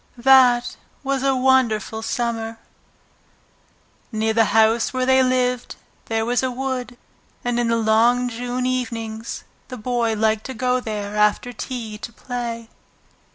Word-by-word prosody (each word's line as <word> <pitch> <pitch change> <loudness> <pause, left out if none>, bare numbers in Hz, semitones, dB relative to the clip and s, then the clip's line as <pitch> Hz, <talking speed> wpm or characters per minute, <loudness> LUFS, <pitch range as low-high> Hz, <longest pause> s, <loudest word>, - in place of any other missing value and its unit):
That 245 -1 +5 0.3
was 275 -1 -1
a 270 0 +2
wonderful 250 -4 +2
Summer! 230 -1 -2 1.5
Near 220 0 0
the 225 0 +4
house 225 +2 +3
where 255 -1 -1
they 260 0 +5
lived 250 -1 0 0.3
there 225 0 -1
was 245 +1 +1
a 260 - 0
wood, 250 -1 -4 0.5
and 240 0 0
in 240 - +1
the 230 0 +2
long 230 +3 +3
June 245 +1 -3
evenings 230 -3 -3 0.2
the 255 - -7
Boy 235 -1 0
liked 220 0 0
to 260 - -6
go 250 +1 +1
there 210 -3 -5
after 210 +4 +2
tea 225 -3 -6
to 235 - -7
play. 235 -1 -5
240 Hz, 140 wpm, -22 LUFS, 225-255 Hz, 1.5 s, That